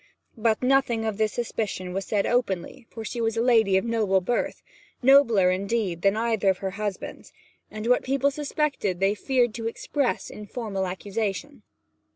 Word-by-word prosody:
But 225 0 +1
nothing 250 -4 +2
of 220 -1 -3
this 215 -1 +2
suspicion 205 -6 -3
was 195 0 -3
said 205 -2 0
openly, 235 0 -1
for 225 -1 -8
she 235 - -4
was 225 0 0
a - - +2
lady 220 -6 +4
of 190 - 0
noble 215 -5 +2
birth 235 +7 -2 0.4
nobler, 235 -9 +6
indeed, 195 -2 -1
than 195 +2 +3
either 225 -3 +1
of 190 - +2
her 190 0 -4
husbands 205 -1 -5 0.4
and 215 0 -6
what 250 +1 +3
people 275 +1 +1
suspected 285 - -1
they 195 +1 +3
feared 245 +1 +1
to 225 0 -4
express 260 +3 -2
in 210 0 -9
formal 200 -5 -3
accusation. 205 +8 -4
220 Hz, 170 wpm, -25 LUFS, 195-240 Hz, 0.4 s, nobler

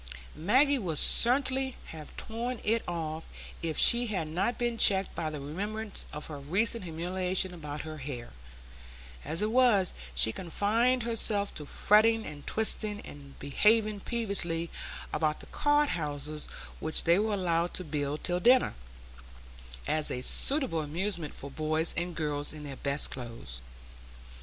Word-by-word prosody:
Maggie 260 - +3
would 170 -8 -2
certainly 265 - +3 0.2
have 155 -2 -10
torn 235 +2 -4
it 225 +2 +2
off, 160 -2 -4 0.3
if 160 -2 -2
she 240 +1 +6
had 185 -7 -2
not 190 +9 -1
been 240 -1 -1
checked 195 -1 +5
by 160 - -2
the 150 -1 -5
remembrance 205 +9 -3
of 150 - -6
her 150 -3 -7
recent 195 - +1
humiliation 180 +2 -1
about 150 -3 -6
her 155 -1 -7
hair; 130 -3 -6 0.9
as 160 +7 -2
it 215 - 0
was, 230 -7 +4 0.2
she 85 - +2
confined 220 - +1
herself 215 -3 0
to 150 - -7
fretting 220 +5 +4
and 145 -1 -9
twisting, 215 -1 +1
and 140 -1 -12
behaving 210 +9 +2
peevishly 195 -7 -1 0.4
about 155 0 0
the - - -12
card 290 0 +2
houses 150 -1 -3 0.3
which 160 - -1
they 170 +2 +4
were 215 0 +1
allowed 175 -2 0
to 185 - -4
build 150 -2 -3
till 175 0 0
dinner, 250 +6 +5 1.1
as 155 -1 +1
a 125 - -3
suitable 265 - 0
amusement 170 +2 -2
for 140 - -8
boys 155 +2 +1
and 175 0 -3
girls 150 -2 -1
in 150 -1 -9
their 140 -2 -6
best 140 +1 -1
clothes. 115 - -7
175 Hz, 145 wpm, -30 LUFS, 150-220 Hz, 1.1 s, she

